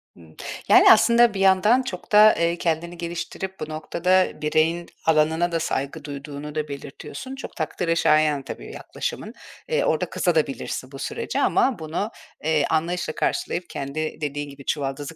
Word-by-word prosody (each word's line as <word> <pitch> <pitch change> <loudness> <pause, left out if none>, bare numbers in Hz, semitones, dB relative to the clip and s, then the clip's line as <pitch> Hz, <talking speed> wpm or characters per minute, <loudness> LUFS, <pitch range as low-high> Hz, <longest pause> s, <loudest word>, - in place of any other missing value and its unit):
Hımm, 80 -2 -17 0.3
yani, - - +8
aslında 235 -1 +5
bir 195 - -4
yandan 195 +6 +4
çok 255 - -7
da, 210 +1 +7
ııı, 170 0 +2
kendini 170 +1 -2
geliştirip 175 +3 -5
bu 155 - -5
noktada 180 +4 0
bireyin 160 +3 +1 0.2
alanına 160 +2 +2
da 165 - 0
saygı 145 -1 -3
duyduğunu 145 +1 -7
da 155 -1 -2
belirtiyorsun. 145 - -8
Çok 270 - -9
takdire 165 +1 -1
şayan 155 -3 +3
tabii 140 - -8
yaklaşımın. - - -5 0.4
Iıı, 485 +1 +1
orada - - 0
kızabilirsin - - -1
de - - -22
bu - - -9
sürece - - -3
ama 260 -8 +2
bunu, 160 +7 -3 0.3
eee, 155 -2 +2
anlayışla 165 0 -1
karşılayıp, 175 0 -2
kendi 155 +4 -4
dediğin 145 0 -3
gibi 140 -1 -12
çuvaldızı 145 +2 -3
160 Hz, 155 wpm, -23 LUFS, 150-180 Hz, 0.4 s, yani